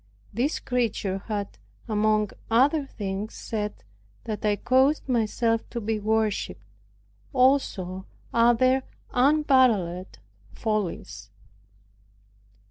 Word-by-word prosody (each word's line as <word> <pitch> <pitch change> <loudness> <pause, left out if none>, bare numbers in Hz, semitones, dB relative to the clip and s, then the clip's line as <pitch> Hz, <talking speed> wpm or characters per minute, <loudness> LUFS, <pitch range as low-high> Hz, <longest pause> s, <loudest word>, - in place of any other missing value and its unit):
This 250 +8 0
creature 225 -6 -1
had, 205 -3 -4 0.3
among 215 -1 +1 0.2
other 275 +5 +3
things, 200 -2 -5
said 210 -2 -4 0.4
that 215 -2 -5
I 210 -1 +2
caused 265 +8 +2
myself 230 -1 0
to 235 - -4
be 220 0 -2
worshiped; 215 0 -1 0.7
also 215 -9 +1 0.3
other 240 +3 +4 0.3
unparalleled 250 - +3 0.4
follies. 215 -6 -3
225 Hz, 85 wpm, -26 LUFS, 210-255 Hz, 0.7 s, other